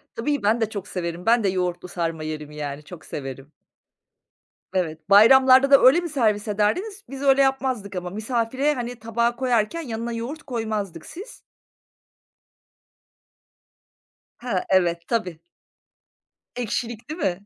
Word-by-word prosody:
Tabii, 285 +2 -1
ben 220 +3 +2
de 220 - +1
çok 200 -2 -6
severim. 170 -1 -5
Ben 230 -1 +4
de 195 - +2
yoğurtlu 180 -1 -2
sarma 165 -3 -3
yerim 150 -1 -6
yani. 150 -1 -6
Çok 165 -1 -12
severim. 135 +1 -7 1.2
Evet. 160 -2 -3
Bayramlarda 260 +6 +7
da 275 - +8
öyle 270 +7 +7
mi 340 - -5
servis 220 -7 0
ederdiniz? 365 - -1
Biz 275 0 -7
öyle 275 0 +4
yapmazdık 260 -7 0
ama. 180 0 -4
Misafire, 235 +7 -1
hani, 245 -2 -5
tabağı 235 +2 0
koyarken, 250 +4 0
yanına 235 -4 -4
yoğurt 255 +7 -5
koymazdık, 215 - -4
siz? 395 +8 -10 3.0
Ha. 235 -7 -2
Evet. 170 -2 +2
Tabii. 185 -8 -2 1.2
Ekşilik 235 0 -4
değil 315 +3 -6
mi? 195 - -2
220 Hz, 130 wpm, -23 LUFS, 180-260 Hz, 3.0 s, da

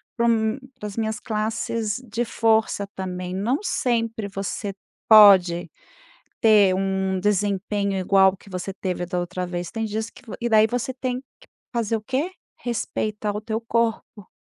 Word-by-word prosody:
para 235 - +1
um 220 0 +2 0.2
para 210 - -5
as 205 - -9
minhas 220 -1 -1
classes 220 0 -2
de 235 +3 0
força 220 -3 +1
também. 180 -1 -4
Não 230 +9 0
sempre 230 - -1
você 195 0 -4 0.4
pode 185 -6 +7 0.7
ter 210 -4 +5
um 190 0 0
desempenho 200 0 0
igual 190 +1 +4
ao 190 - -11
que 195 - -17
você 185 +1 -4
teve 180 -2 -3
da 180 0 -2
outra 180 +1 -4
vez, 175 -1 -4
tem 225 -1 -3
dias 220 +1 -3
que - - -17
vo 220 - -7
e 240 - 0
daí 220 -1 +6
você 245 +3 -2
tem 255 -1 -3
que 270 - -28 0.5
fazer 230 -2 0
o - - -9
quê? 265 - -2 0.3
Respeitar 215 -3 -3
o 210 - -3
teu 220 0 -2
corpo. 230 -3 -2
210 Hz, 165 wpm, -23 LUFS, 190-225 Hz, 0.7 s, pode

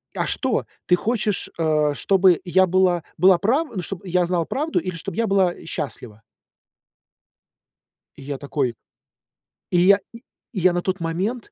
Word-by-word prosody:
"А - - -1
что, - - -1 0.2
ты 180 - +5
хочешь, 215 0 -2
э, 155 -2 +2
чтобы 190 +1 +3
я 185 +1 +4
была 180 -2 +2
была 185 +2 +6
прав 265 - +1
ну 185 - -2
чтоб 195 +2 -7
я 180 -1 +1
знала 170 -1 0
правду, 305 - -1
или 185 -2 -5
чтоб 165 - -6
я 230 0 0
была 190 -3 +2
счастлива?" 120 -8 -6 2.0
Я 140 0 -5
такой 135 -3 -2 1.0
И 180 - +2
я 200 +2 +6 0.5
я 185 -3 +2
на 175 - 0
тот 185 +1 -2
момент. 185 +9 -3
180 Hz, 145 wpm, -22 LUFS, 165-195 Hz, 2.0 s, была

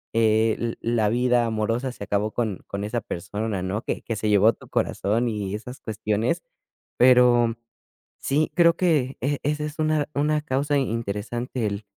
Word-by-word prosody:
eh, 110 0 +3
l 115 -1 -2
la 115 -3 +1
vida 125 0 +2
amorosa 115 +3 -1
se 100 - -8
acabó 105 +1 0
con 110 -6 -2
con 100 +1 -4
esa 115 +3 -2
persona, 105 +2 -4
¿no? 100 +4 -2
que - - -3
que 115 - -3
se 105 +1 -1
llevó 105 +2 +5
tu - - -17
corazón 115 +4 0
y 105 -3 -3
esas 125 +4 -8
cuestiones, 110 +1 -1 0.6
pero 125 -2 +5 0.6
sí, 150 +3 0
creo 170 -1 +5
que 150 -8 +1
e 140 +2 0
esa 150 +1 -1
es 150 +1 -6
una 155 -1 +1
una 150 +1 +1
causa 140 +1 0
i - - +2
interesante, 115 +2 -3
el 100 0 -3
115 Hz, 170 wpm, -24 LUFS, 105-130 Hz, 0.6 s, llevó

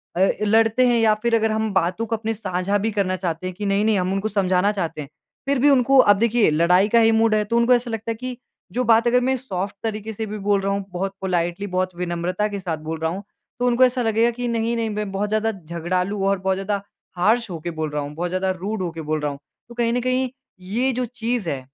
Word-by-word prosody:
अ, 190 +2 +3 0.2
लड़ते 225 +3 +4
हैं 240 -1 +3
या 220 -1 +4
फिर 235 -1 +3
अगर 220 -1 +2
हम 220 0 -1
बातों 190 +5 0
को 225 - -1
अपने 225 0 -3
साझा 200 -2 -1
भी 220 +2 -1
करना 195 -3 0
चाहते 180 -1 -3
हैं 185 - -6
कि 205 - -5
नहीं, 200 +1 +1
नहीं 220 -2 +3
हम 180 +1 -1
उनको 195 +3 -1
समझाना 190 -1 +2
चाहते 170 -6 -3
हैं। 140 - -9 0.4
फिर 280 -1 +1
भी 290 +4 +5
उनको 270 0 +4
अब - - +5
देखिए 235 -3 +3
लड़ाई 180 +5 +4
का 235 +2 +5
ही 225 0 +5
मूड 225 0 +3
है, 210 - +2
तो 230 +3 0
उनको 235 +2 +4
ऐसा 240 -1 0
लगता 225 +1 -3
है - - -3
कि 250 +1 -6 0.4
जो 250 - 0
बात 230 0 +4
अगर 245 +1 +4
मैं 260 +1 +1
सॉफ्ट 195 -6 -4
तरीके 220 0 -4
से 220 +1 -4
भी 215 0 -6
बोल 205 -1 +3
रहा 195 - -1
हूँ, 200 -1 -3
बहुत 190 +2 -3
पोलाइटली, 180 +1 -1
बहुत 185 -1 -2
विनम्रता 180 +3 -2
के 205 -1 -5
साथ 175 -4 -3
बोल 160 0 -3
रहा 160 0 -1
हूँ, 195 +3 -6 0.4
तो 245 - +1
उनको 245 +1 +4
ऐसा 250 0 0
लगेगा 230 +1 +2
कि 245 +1 -4
नहीं, 230 0 0
नहीं 225 -1 -1
मैं 210 -2 -3
बहुत 205 +2 -2
ज़्यादा 215 +1 +1
झगड़ालू 180 +2 -3
और 195 -1 +1
बहुत 190 0 0
ज़्यादा 200 +1 -2 0.4
हार्श 220 +4 +2
होके 170 0 -5
बोल 160 -1 -3
रहा 150 0 -2
हूँ, 145 +1 -7
बहुत 175 +2 -2
ज़्यादा 185 +1 -1
रूड 190 +3 -4
हो 180 - -1
के 165 - -7
बोल 155 0 -2
रहा 150 -1 -1
हूँ। 140 - -9 0.3
तो 240 - -11
कहीं 235 -1 +1
न 245 - 0
कहीं, 255 +1 0 0.3
ये 225 +9 -1
जो 250 +1 -1
चीज़ 235 -5 -3
है, 140 - -2
205 Hz, 260 wpm, -22 LUFS, 185-230 Hz, 0.4 s, भी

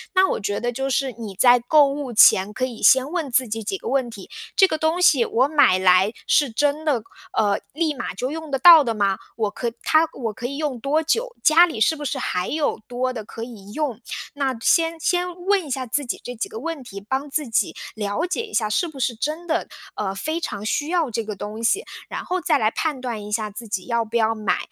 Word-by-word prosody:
那 380 0 +5
我 - - -1
觉 205 0 -2
得 240 +1 -2
就 270 +3 -3
是 270 0 0
你 210 -4 -7
在 245 +4 +5
购 285 +4 +4
物 275 -2 -4
前 200 -2 +6
可 255 +2 -1
以 240 -3 -8
先 260 +6 +5
问 335 -5 -2
自 255 +1 +2
己 225 +1 -4
几 380 - -3
个 - - -9
问 260 -3 0
题， 200 -4 -11 0.3
这 385 - +6
个 315 - -2
东 320 +3 +1
西 280 -8 +5
我 255 +3 +2
买 285 -11 +4
来 185 +2 +4 0.2
是 285 -4 +3
真 290 +6 0
的， 275 -8 0 0.3
呃， 205 -2 +2
立 310 0 0
马 245 -8 -5
就 255 +7 -3
用 320 -1 -6
得 270 - 0
到 325 +2 +9
的 230 -4 -2
吗？ 200 -2 +1 0.2
我 215 -3 -1
可 235 +2 -3
它， 315 +1 +4
我 230 -4 -4
可 240 +3 -5
以 280 +2 -6
用 290 -6 -3
多 300 +6 0
久？ 470 +10 -1
家 330 +2 +7
里 235 -9 -6
是 270 +9 +3
不 295 - -8
是 270 - -2
还 180 -7 -2
有 305 -1 -1
多 255 +1 -2
的 225 -4 -6
可 225 +2 -8
以 205 -5 -10
用？ 285 -7 -2 0.4
那 270 -3 -1
先 330 +3 +2
先 355 +1 0
问 390 -5 +2
一 - - -9
下 260 -1 -2
自 275 +4 -2
己 - - -5
这 245 - -6
几 220 - -3
个 220 - -8
问 320 +1 -5
题， 200 -5 -9
帮 265 +7 -3
自 285 -3 -2
己 225 - 0 0.2
了 210 +9 -2
解 370 +6 -2
一 435 - -15
下 215 -3 +1
是 340 +11 0
不 310 - -11
是 245 -1 0
真 305 +9 -4
的， 335 0 -1 0.3
呃， 195 -2 -3
非 315 - -3
常 210 -10 -5
需 290 +7 -1
要 330 -7 0
这 230 0 -3
个 210 -1 -5
东 210 +3 -7
西？ 390 - +1 0.2
然 - - -5
后 365 +1 -2
再 315 -3 +2
来 215 -4 +1
判 295 -2 -2
断 230 -5 -5
一 210 - -9
下 215 -1 -1
自 230 +3 -9
己 190 -3 -3
要 235 -1 0
不 220 - -9
要 225 -1 +3
买。 215 -3 -1
255 Hz, 265 characters per minute, -22 LUFS, 220-310 Hz, 0.4 s, 到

